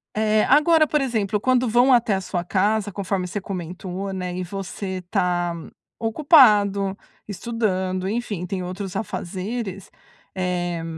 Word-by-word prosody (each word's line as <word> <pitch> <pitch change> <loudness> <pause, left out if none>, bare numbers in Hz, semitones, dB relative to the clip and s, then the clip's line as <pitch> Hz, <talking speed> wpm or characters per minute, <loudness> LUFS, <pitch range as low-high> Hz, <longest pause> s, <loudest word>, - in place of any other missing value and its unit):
Eh, 215 0 +2
agora, 310 +2 +5
por 300 -1 +1
exemplo, 220 -5 0
quando 255 +2 +2
vão 245 +4 +5
até 230 -4 +3
a 190 - -2
sua 180 -2 -3
casa, 205 +3 0
conforme 195 -1 -2
você 195 +4 -4
comentou, 185 +1 -5
né, 180 -1 -4
e 185 - -3
você 190 0 -5
tá 175 -3 +1 0.5
ocupado, 210 - +4 0.3
estudando, 190 -3 -2
enfim, 210 -4 -3
tem 185 0 -4
outros 185 +1 -6
afazeres, 195 0 -4 0.5
eh, 175 -2 -2
195 Hz, 130 wpm, -23 LUFS, 185-220 Hz, 0.5 s, agora